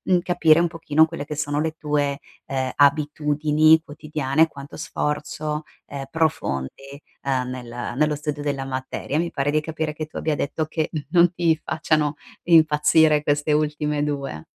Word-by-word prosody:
per 175 - +2
capire 165 -2 +4
un 175 - +1
pochino 160 -2 +2
quelle 160 -3 -6
che 150 - -5
sono 145 0 -1
le 160 0 -1
tue, 145 -2 -1 0.3
ehm, 130 -1 -2
abitudini 150 +2 +3
quotidiane, 150 0 0
quanto 140 -2 -11
sforzo, 150 +1 -3 0.2
ehm, 140 -1 -6
profondi, 145 - -1 0.5
ehm, 130 -2 -1
nel 120 -1 -6
nello 150 +1 +2
studio 150 0 -4
della 140 -2 -2
materia. 135 +2 -3
Mi 170 0 -1
pare 140 0 -1
di 155 - +2
capire 160 0 -3
che 155 +1 -5
tu 155 - -24
abbia 155 -1 -1
detto, 150 +3 -2
che 155 0 -2 0.2
non 175 0 +5
ti 165 -2 +1
facciano 155 -2 0 0.3
impazzire 155 -1 +5
queste 145 +1 0
ultime 150 0 0
2. 140 - -3
150 Hz, 155 wpm, -23 LUFS, 145-155 Hz, 0.5 s, non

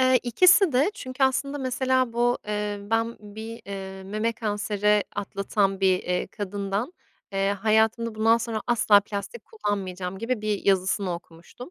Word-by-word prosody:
Eee, 255 0 +4
ikisi 360 - +5
de 275 +10 +3
çünkü 255 -3 -5
aslında, 275 +2 0
mesela, 260 -2 0
bu, 240 +1 +1
eee, 210 -1 -2
ben 225 +3 -1
bir, 220 +2 -8
eee, 190 -1 -7
meme 215 +4 -1
kanseri 210 -1 0
atlatan 195 0 -1
bir, 185 -1 +4
eee, 180 0 -1
kadından, 205 - -3 0.4
eee, 195 0 +1
"Hayatımda, 220 +2 +1
bundan 225 +1 +4
sonra 225 -2 -3
asla 220 -4 +5
plastik 205 - -6
kullanmayacağım." 190 - -4
gibi 230 0 -2
bir 210 -2 -2
yazısını 190 -1 +1
okumuştum. 170 - -12
215 Hz, 145 wpm, -25 LUFS, 195-240 Hz, 0.4 s, ikisi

